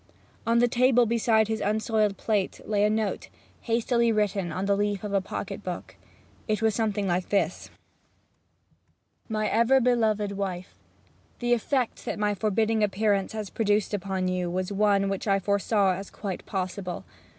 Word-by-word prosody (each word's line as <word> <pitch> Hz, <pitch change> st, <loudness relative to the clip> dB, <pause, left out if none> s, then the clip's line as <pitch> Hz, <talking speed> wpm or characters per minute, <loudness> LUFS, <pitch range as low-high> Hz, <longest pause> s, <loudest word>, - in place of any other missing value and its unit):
On 230 Hz, 0 st, +3 dB
the 240 Hz, +1 st, +5 dB
table 245 Hz, 0 st, +4 dB
beside 225 Hz, -1 st, +2 dB
his 220 Hz, 0 st, -2 dB
unsoiled 215 Hz, -1 st, +1 dB
plate 205 Hz, -3 st, -1 dB
lay 205 Hz, -1 st, +2 dB
a 210 Hz, -, +4 dB
note, 215 Hz, -1 st, -1 dB, 0.3 s
hastily 235 Hz, 0 st, +1 dB
written 200 Hz, -4 st, 0 dB
on 185 Hz, +4 st, -2 dB
the 200 Hz, 0 st, +2 dB
leaf 205 Hz, 0 st, -1 dB
of 205 Hz, -1 st, -4 dB
a 195 Hz, -, +3 dB
pocket 190 Hz, -, -6 dB
book. -, -, -6 dB, 0.5 s
It 215 Hz, -1 st, 0 dB
was 220 Hz, -1 st, +2 dB
something 210 Hz, -2 st, 0 dB
like 180 Hz, 0 st, -1 dB
this: 200 Hz, -, 0 dB, 1.6 s
'MY 215 Hz, -1 st, 0 dB
EVER 235 Hz, +4 st, +4 dB
BELOVED 220 Hz, -5 st, +1 dB
WIFE 190 Hz, -2 st, -4 dB, 0.6 s
The 240 Hz, 0 st, +1 dB
effect 245 Hz, +1 st, -1 dB
that -, -, -3 dB
my 210 Hz, 0 st, +1 dB
forbidding 215 Hz, +2 st, +1 dB
appearance 205 Hz, -1 st, +1 dB
has 215 Hz, -3 st, -5 dB
produced 210 Hz, -1 st, +1 dB
upon 190 Hz, -2 st, -1 dB
you 180 Hz, -1 st, -1 dB
was 185 Hz, +2 st, -2 dB
one 200 Hz, -1 st, +2 dB
which 195 Hz, +2 st, -3 dB
I 195 Hz, -1 st, +4 dB
foresaw 200 Hz, 0 st, +2 dB
as 195 Hz, +2 st, -6 dB
quite 195 Hz, -3 st, -6 dB
possible. 185 Hz, -, -4 dB
210 Hz, 160 wpm, -27 LUFS, 195-220 Hz, 1.6 s, the